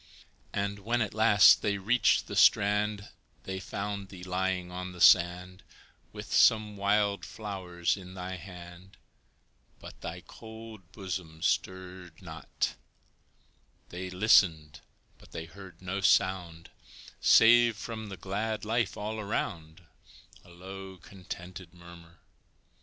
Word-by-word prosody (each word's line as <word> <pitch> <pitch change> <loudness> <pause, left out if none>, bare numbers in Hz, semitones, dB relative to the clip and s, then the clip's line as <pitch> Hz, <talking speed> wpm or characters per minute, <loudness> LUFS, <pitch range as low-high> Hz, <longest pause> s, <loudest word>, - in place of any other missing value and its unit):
And, 100 0 -3
when 115 +4 -1
at 105 - -6
last 105 -3 +6
they 100 -1 0
reached 110 +5 +2
the - - -7
strand, 105 0 +3 0.3
They 95 0 -5
found 100 +1 -5
thee 95 -2 -11
lying 90 0 -2
on 90 0 -6
the 90 - -12
sand 90 +2 +4 0.5
With - - -8
some 110 -2 +4
wild 100 -1 +1
flowers 90 -1 -3
in 95 -2 -11
thy 95 0 -6
hand, 90 0 -12 0.8
But - - -13
thy - - -6
cold 110 -4 -12
bosom 90 -5 -7
stirred 90 -2 -3
not; 80 -3 -4 1.2
They 95 +1 -6
listened, 90 -6 +3 0.4
but - - -19
they 80 - -6
heard 95 0 -14
no 95 +2 -3
sound 90 -4 +1 0.5
Save 115 -1 +6
from 110 0 -7
the 95 - -8
glad 105 +5 -3
life 115 -1 -1
all 110 +1 -4
around 85 -5 -4 0.6
A - - -19
low, 95 +2 -10
contented 90 -1 -10
murmur. 85 -1 -15
95 Hz, 120 wpm, -29 LUFS, 90-105 Hz, 1.2 s, last